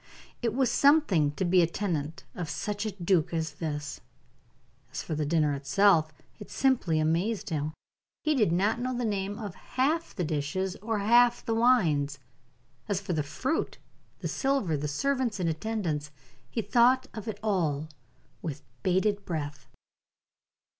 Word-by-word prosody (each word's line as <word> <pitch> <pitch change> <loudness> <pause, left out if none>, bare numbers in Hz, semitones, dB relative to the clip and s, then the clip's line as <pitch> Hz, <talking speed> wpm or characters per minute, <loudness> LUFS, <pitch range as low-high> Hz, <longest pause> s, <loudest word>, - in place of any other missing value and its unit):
It 230 -2 0
was 260 -2 +2
something 280 - +4
to 185 - -1
be 180 +1 +5
a 170 - +4
tenant 165 -4 -3
of 170 -4 -5
such 210 +1 -3
a - - -2
duke 175 -3 +1
as 160 -1 -1
this. 150 -1 -4 0.9
As - - -4
for - - -4
the 150 -1 -1
dinner 150 -2 +2
itself, 155 +3 +3 0.3
it 210 - -10
simply 245 -12 +2
amazed 170 +7 0
him; 155 0 -1 0.5
he 310 - +2
did 215 - +3
not 200 +7 +2
know 255 0 -2
the 245 - -1
name 200 -1 -2
of 205 -5 -5
half 300 - -1
the 180 - -1
dishes 165 +5 -2
or 225 +1 -2
half 240 +4 +4
the 225 - 0
wines; 170 - +3 0.7
as 200 -2 +1
for 190 -2 -3
the 155 - +1
fruit, 155 - -2 0.4
the - - -2
silver, 270 - 0
the 150 +1 -2
servants 250 - 0
in 175 - 0
attendance, 160 -4 -2 0.4
he 225 - -2
thought 255 +3 +4
of 215 -1 -7
it 210 -2 -4
all 160 -8 0 0.5
with 155 -5 -5 0.2
bated 200 - +1
breath. 145 -6 -5
190 Hz, 155 wpm, -28 LUFS, 155-225 Hz, 0.9 s, be